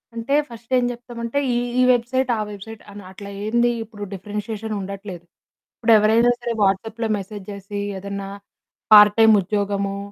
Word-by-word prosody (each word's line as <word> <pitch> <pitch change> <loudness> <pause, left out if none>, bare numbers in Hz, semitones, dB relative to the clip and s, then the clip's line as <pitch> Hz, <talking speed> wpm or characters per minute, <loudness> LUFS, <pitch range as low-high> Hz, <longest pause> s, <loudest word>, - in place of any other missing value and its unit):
అంటే 235 +5 -1
ఫస్ట్ 235 +1 -13
ఏం 250 - +2
చెప్తామంటే 240 +2 -4
ఈ - - 0 0.2
ఈ - - +5
వెబ్‌సైట్ 250 +2 0
ఆ - - -3
వెబ్‌సైట్ 210 +2 -10
అని 205 0 -10
అట్లా 200 +1 -10 0.2
ఏందిప్పుడు 225 -2 -1
డిఫరెన్షియేషన్ 210 +2 -5
ఉండట్లేదు. 195 -2 -8 0.5
ఇప్పుడు 230 0 +2
ఎవరైనా 225 +3 +4
సరే 240 -1 -3
వాట్సాప్‌లో 220 +4 0
మెసేజ్ 200 0 -8
చేసి 200 +1 -7 0.2
ఏదన్నా 200 0 -6 0.6
పార్ట్ 210 -1 +9
టైమ్ 220 -1 +7
ఉద్యోగము 200 0 -2
215 Hz, 140 wpm, -21 LUFS, 200-235 Hz, 0.6 s, పార్ట్